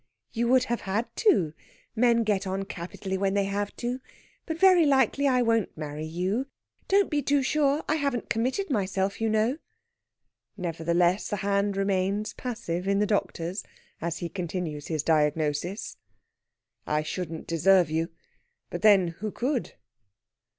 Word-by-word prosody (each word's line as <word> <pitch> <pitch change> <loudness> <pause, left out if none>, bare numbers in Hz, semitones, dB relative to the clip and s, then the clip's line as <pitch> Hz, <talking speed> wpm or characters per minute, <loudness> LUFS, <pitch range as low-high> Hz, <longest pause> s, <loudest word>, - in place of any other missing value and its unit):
"You 235 0 0
would 255 +1 +5
have 240 -1 -2
had 205 +4 -2
to. 190 - +3 0.4
Men 235 0 +4
get 205 -2 0
on 195 +1 -2
capitally 190 +1 -5
when 195 0 +1
they 200 - +3
have 200 +1 -2
to. 245 +1 -3 0.5
But 320 -1 -3
very 370 -1 +6
likely 280 -1 +3
I 250 -2 +3
won't 230 -6 +1
marry 155 0 -5
you. 185 +11 -1 0.4
Don't 395 0 +4
be 295 -1 0
too 280 0 +2
sure! 290 +1 +2
I 310 - +2
haven't 280 -5 -1
committed 260 - -1
myself, 195 -2 -1
you 225 - +2
know." 220 +7 +1 1.0
Nevertheless, 175 +1 +1
the - - -2
hand 200 0 +1
remains 195 +2 0
passive 195 -8 -4
in 200 0 +2
the 210 - +3
doctor's, 190 -3 -2 0.4
as 165 0 -2
he 170 - -3
continues 170 -4 -4
his 155 -3 -1
diagnosis: 155 +4 0 0.9
"I 150 0 +1
shouldn't 165 0 -5
deserve 170 0 +3
you. 165 +2 0 0.6
But, - - -4
then, 200 -5 +6
who 200 +6 -5
could?" 255 +2 -2
200 Hz, 150 wpm, -27 LUFS, 175-240 Hz, 1.0 s, very